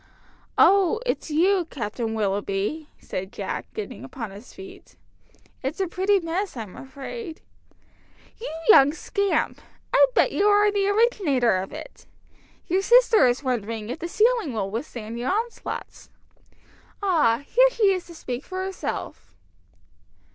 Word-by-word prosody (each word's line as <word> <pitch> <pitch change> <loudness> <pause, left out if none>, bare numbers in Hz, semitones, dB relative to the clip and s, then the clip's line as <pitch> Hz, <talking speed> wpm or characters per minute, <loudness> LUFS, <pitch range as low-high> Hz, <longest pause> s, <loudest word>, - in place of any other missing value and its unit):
"Oh 395 +2 +5
it's - - -2
you, 355 +4 +3
Captain 225 -2 -4
Willoughby," 205 +8 -2
said 190 +1 -6
Jack, - - -5
getting 430 - -6
upon 225 -6 -7
his 205 +5 -12
feet. 385 0 -13 0.7
"It's 275 +7 -4
a 385 - +2
pretty 385 +3 +2
mess, 345 -1 -3
I'm 215 -5 -7
afraid." 315 - -8 1.0
"You 460 - -5 0.2
young 285 -8 +8
scamp! 400 +4 -1 0.3
I - - +7
bet - - +4
you 405 - +2
are 415 0 +5
the 400 -1 +1
originator 380 - +2
of 190 +1 -4
it! - - -10 0.6
Your 370 +3 +1
sister 470 - +5
is 245 +3 0
wondering 230 -3 -3
if 260 - -5
the 340 - -4
ceiling 445 - +2
will 195 -3 -2
withstand 230 -1 -5
your 250 +2 -2
onslaughts. 455 +4 -4 0.9
Ah, 295 -10 +2
here - - +5
she 425 -5 +3
is 370 -2 -4
to 340 - -12
speak 255 -3 -5
for 375 0 -4
herself." 385 0 -6
330 Hz, 140 wpm, -24 LUFS, -, 1.0 s, young